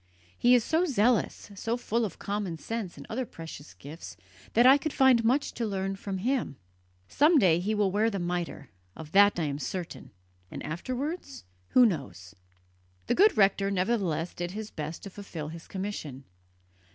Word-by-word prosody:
He 245 +1 +5
is 240 - +3
so 320 +7 +1
zealous, 240 - +1
so 225 +4 -2
full 235 -1 -1
of 200 - -7
common 200 -4 -3
sense 215 +2 -5
and - - -10
other 255 +4 -2
precious 165 - -10
gifts 150 +4 -10 0.4
that 240 +2 +5
I 270 +2 +8
could 310 0 -3
find 260 -3 +5
much 255 +6 +1
to 235 - -2
learn 195 -1 -2
from 195 0 -5
him. 245 - -1 0.5
Some 305 - +4
day 175 - +4
he 210 +5 -1
will 205 -2 +2
wear 215 +3 +2
the 200 - -3
mitre 175 -6 -4 0.2
of 155 -1 -10
that 205 0 +6
I - - 0
am 145 -1 -2
certain 165 -2 -5 0.4
and - - -7
afterwards? 265 - -4 0.3
Who 250 - +7
knows?" 100 - -3 0.7
The - - +1
good 415 +4 +5
rector 195 -1 +3
nevertheless 185 -4 0
did 175 +1 -5
his 215 +1 -6
best 155 +1 -6
to 200 - -8
fulfil 170 -7 -7
his 165 +1 -10
commission. 185 -9 -5
200 Hz, 175 wpm, -28 LUFS, 170-235 Hz, 0.7 s, I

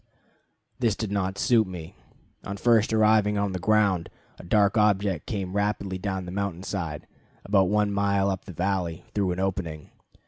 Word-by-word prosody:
This 115 -5 +2
did 110 -2 -4
not 95 -1 -1
suit 115 -4 +3
me. 85 -3 -8 0.5
On 100 -1 -5
first 115 +1 +3
arriving 110 -1 +3
on 100 -1 0
the 95 - -3
ground, 100 -3 +2 0.3
a - - -10
dark 100 +3 +3
object 100 -5 +2
came 95 -3 -3
rapidly 100 -2 -1
down 95 -1 -3
the 90 - -7
mountain 95 -2 -3
side, 85 -7 -4 0.4
about 95 -2 +3
one 105 0 +2
mile 100 -1 +1
up 95 - -5
the - - -8
valley, 90 -1 -2
through 100 -3 0
an 90 - -3
opening. 90 -5 -3
100 Hz, 170 wpm, -26 LUFS, 95-105 Hz, 0.5 s, suit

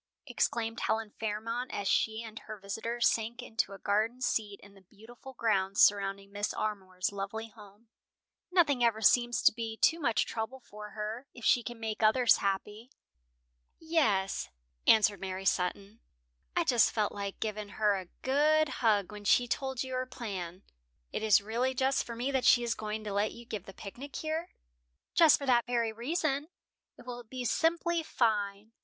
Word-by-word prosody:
exclaimed 225 -1 -1
Helen 220 -1 -1
Fairmont 225 +3 -3
as 200 - -3
she 220 +3 +1
and 220 -1 -8
her 215 0 -9
visitor 225 +4 -4
sank 235 +2 +1
into 225 -4 -2
a - - -8
garden 215 +5 0
seat 210 -5 -1
in 200 0 -15
the 195 - -18
beautiful 225 +7 -14
grounds 195 -3 +1
surrounding 200 -1 +3
Mrs. 205 0 -2
Armour's 190 -3 -2
lovely 205 +3 -5
home. 210 0 -16 0.6
"Nothing 295 -9 +3
ever 225 -2 +2
seems 240 +2 +3
to - - +7
be 225 -1 -5
too 325 +7 +3
much 235 -8 +1
trouble 230 +4 -4
for 210 -3 -10
her, 220 +5 -4
if 240 - -9
she 245 - +5
can 240 0 -7
make 220 -1 -4
others 230 +3 +5
happy." 205 +4 -3 0.9
"Yes," 275 - 0 0.4
answered 210 -2 +5
Mary 190 0 -5
Sutton, 195 +4 -1 0.6
"I - - +3
just 240 -3 +4
felt 210 -2 0
like 200 -1 -5
giving 215 -1 -4
her 210 -1 +1
a 185 -2 -5 0.2
good 305 +3 +3
hug 210 -4 +2
when 210 -1 -9
she 245 +4 +4
told 265 +1 -2
you 260 0 -6
her 255 0 -2
plan. 195 -8 -6 0.5
It - - -3
is 215 -2 +5
really 240 +5 -1
just 265 +1 +1
for 235 - -7
me 250 +4 -2
that 265 -2 0
she 240 - +6
is 235 -1 0
going 215 0 -5
to 210 -2 -4
let 205 +2 0
you 235 0 -12
give 215 -5 -6
the - - -8
picnic 240 +9 -9
here." 315 +2 -3 0.6
"Just 325 -3 +7
for 280 - -6
that 240 -3 +3
very 235 -2 0
reason. 285 +4 -1 0.5
It - - -14
will 245 -1 -7
be 250 +2 -6
simply 335 +4 +1
fine. 215 -6 -1
225 Hz, 175 wpm, -31 LUFS, 205-245 Hz, 0.9 s, to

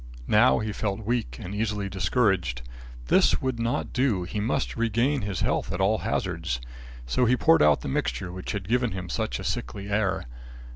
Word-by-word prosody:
Now 105 - +5
he 110 -1 -2
felt 105 0 -3
weak 120 0 -1
and 100 -3 -6
easily 105 -1 -1
discouraged. 95 - 0 0.4
This - - +4
would 130 -3 -2
not 115 +1 -1
do. 125 -8 +1
He 100 +4 -4
must 125 +6 -1
regain 115 +5 +1
his 100 -3 -3
health - - 0
at 90 - -3
all 100 +3 +2
hazards, - - -2 0.5
so 65 - +1
he 125 +2 +3
poured 80 -7 +5
out 75 -1 +5
the - - -5
mixture 65 +5 -2
which 95 +4 -5
had 100 -2 -4
given 120 -1 +1
him 95 -1 -5
such - - -2
a - - -7
sickly 100 +12 -4
air. 100 -2 0
105 Hz, 185 wpm, -26 LUFS, 90-115 Hz, 0.5 s, Now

